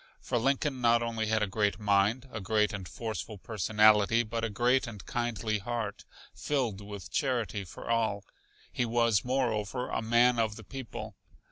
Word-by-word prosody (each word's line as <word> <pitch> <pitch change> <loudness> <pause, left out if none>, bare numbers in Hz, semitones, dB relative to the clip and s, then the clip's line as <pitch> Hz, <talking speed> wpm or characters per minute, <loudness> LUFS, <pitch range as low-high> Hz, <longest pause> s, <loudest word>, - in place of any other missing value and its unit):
For 120 - -1
Lincoln 135 +1 0
not 120 0 +4
only 115 -1 -2
had 110 0 +2
a - - 0
great 100 0 0
mind, 105 +5 +2
a 110 - -5
great 105 +2 +1
and 95 -3 -5
forceful 110 -2 -5
personality, 110 +2 +3
but 115 0 -4
a 115 - 0
great 125 +4 +2
and 105 -5 -9
kindly 110 -3 -1
heart, 110 0 -4 0.3
filled 125 -9 -1
with 100 -2 -8
charity 120 - -1
for 90 - -10
all. 110 -3 0 0.5
He - - 0
was, 115 -3 +2
moreover, 125 -2 -1
a - - -1
man 120 +2 +4
of 110 -2 +1
the 110 - -10
people. 130 +2 -7
115 Hz, 165 wpm, -30 LUFS, 105-120 Hz, 0.5 s, not